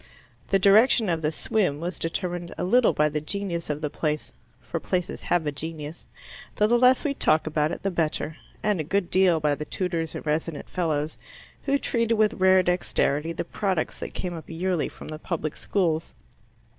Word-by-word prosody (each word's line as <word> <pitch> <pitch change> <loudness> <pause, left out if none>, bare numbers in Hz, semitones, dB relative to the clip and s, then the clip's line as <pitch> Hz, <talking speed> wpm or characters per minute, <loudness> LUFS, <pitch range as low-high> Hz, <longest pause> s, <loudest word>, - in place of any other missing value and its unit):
The 195 - +3
direction 210 +3 +5
of 165 -2 0
the 150 0 0
swim 170 -3 0
was 175 +3 -4
determined 175 +1 -3
a - - -2
little 235 +6 +4
by 150 - +2
the 150 0 -2
genius 170 0 -3
of 150 0 -2
the 150 - -1
place 150 -1 -2 0.3
for 120 -4 -4
places 180 -2 -2
have 175 -3 +1
a 150 - 0
genius, 155 +1 -6 0.5
though 210 - +3
the 240 +2 +3
less 255 +1 +5
we 290 - 0
talk 155 - +2
about 155 0 0
it - - -6
the 195 - 0
better 160 -2 -1 0.3
and 210 -4 +1
a - - 0
good 185 +3 -1
deal 185 -3 +4
by 150 -1 +2
the 145 +1 -3
tutors 165 -1 -2
and - - -6
resident 155 0 -2
fellows, 155 -3 -2 0.5
who 280 0 +3
treated 230 -4 0
with 215 0 +3
rare 185 0 +6
dexterity 165 -3 0
the 170 - -4
products 190 -3 -2
that - - -6
came 180 -1 -3
up 165 -2 -9
yearly 175 0 -1
from - - -11
the 155 0 -6
public 155 -3 -3
schools. 165 -5 -1
170 Hz, 195 wpm, -26 LUFS, 155-195 Hz, 0.5 s, rare